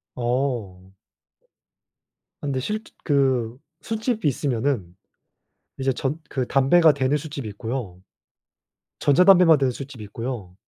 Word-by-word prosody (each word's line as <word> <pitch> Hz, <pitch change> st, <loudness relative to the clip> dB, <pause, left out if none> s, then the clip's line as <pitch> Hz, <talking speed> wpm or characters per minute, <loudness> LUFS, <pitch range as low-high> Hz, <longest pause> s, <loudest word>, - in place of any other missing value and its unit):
어. 120 Hz, -7 st, -2 dB, 1.5 s
아 -, -, -6 dB
근데 135 Hz, -2 st, -1 dB
실즈 215 Hz, -, -4 dB
그 130 Hz, -5 st, +1 dB, 0.2 s
술집이 225 Hz, -, -2 dB
있으면은 125 Hz, -, -1 dB, 0.8 s
이제 135 Hz, 0 st, +1 dB
전 140 Hz, +5 st, -3 dB
그 130 Hz, -2 st, -2 dB
담배가 150 Hz, +5 st, +5 dB
되는 135 Hz, +1 st, +1 dB
술집이 145 Hz, -6 st, -6 dB
있고요. 105 Hz, -3 st, -5 dB, 1.0 s
전자담배만 180 Hz, +1 st, +6 dB
되는 135 Hz, -2 st, +1 dB
술집이 135 Hz, -3 st, -9 dB
있고요. 110 Hz, -3 st, -6 dB
135 Hz, 235 characters per minute, -23 LUFS, 115-145 Hz, 1.5 s, 전자담배만